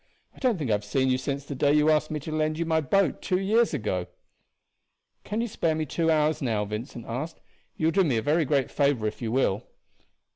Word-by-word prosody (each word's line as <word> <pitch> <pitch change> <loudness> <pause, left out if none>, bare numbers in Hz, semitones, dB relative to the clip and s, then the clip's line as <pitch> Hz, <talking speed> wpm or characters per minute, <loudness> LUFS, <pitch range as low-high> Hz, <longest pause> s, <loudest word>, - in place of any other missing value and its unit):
I - - -15
don't 245 -6 +2
think 140 -8 -2
I - - +4
have 105 0 0
seen 130 +5 +1
you 130 - +1
since 140 +1 -3
the 140 - -5
day 145 +2 +2
you 150 +1 +4
asked 155 0 +2
me 155 - -3
to 155 - -6
lend 155 0 0
you 170 - -1
my 160 -1 +2
boat 195 +8 +1
two 185 - 0
years 220 +4 +2
ago." 105 - -2 1.2
"Can 215 +2 -2
you 235 - -1
spare 165 -7 0
me 155 0 -1
two 165 +3 0
hours 155 0 +2
now?" 110 -6 0
Vincent 110 +3 -6
asked. 135 +8 -5 0.4
"You 155 - -1
will 165 - +4
do 195 +2 +3
me 135 -9 +1
a - - +1
very 155 +5 +2
great 140 -2 +1
favor 140 -6 +1
if 105 - -3
you 115 -2 -2
will." 120 -4 +1
150 Hz, 240 wpm, -26 LUFS, 125-160 Hz, 1.2 s, I